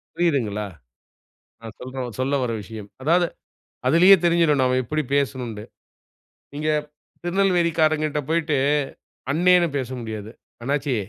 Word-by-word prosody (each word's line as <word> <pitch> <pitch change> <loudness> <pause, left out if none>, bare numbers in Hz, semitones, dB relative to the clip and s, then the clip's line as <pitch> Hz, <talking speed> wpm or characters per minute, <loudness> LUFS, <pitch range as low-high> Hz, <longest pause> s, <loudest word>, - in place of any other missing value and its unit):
புரியுதுங்களா? 120 -12 0 0.9
நான் 115 -1 -10
சொல்ற 130 +1 -5 0.2
சொல்லவர்ற 130 -3 0
விஷயம். 105 0 -9
அதாவது 170 +4 +3 0.6
அதிலேயே 180 +8 +7
தெரிஞ்சிடும். 165 -4 +3
நாம 130 0 +2
எப்படி 155 +5 -1
பேசனுண்டு. 125 -6 -2 0.9
நீங்க 150 +2 -2 0.5
திருநெல்வேலிக்காரங்கிட்ட 170 -5 +1
போய்ட்டு, 160 -2 +1 0.7
அண்ணேனு 175 +3 +4
பேச 130 -3 -2
முடியாது. 110 -2 -6 0.3
"அண்ணாச்சி" 140 +1 -1
145 Hz, 95 wpm, -23 LUFS, 125-170 Hz, 0.9 s, அதிலேயே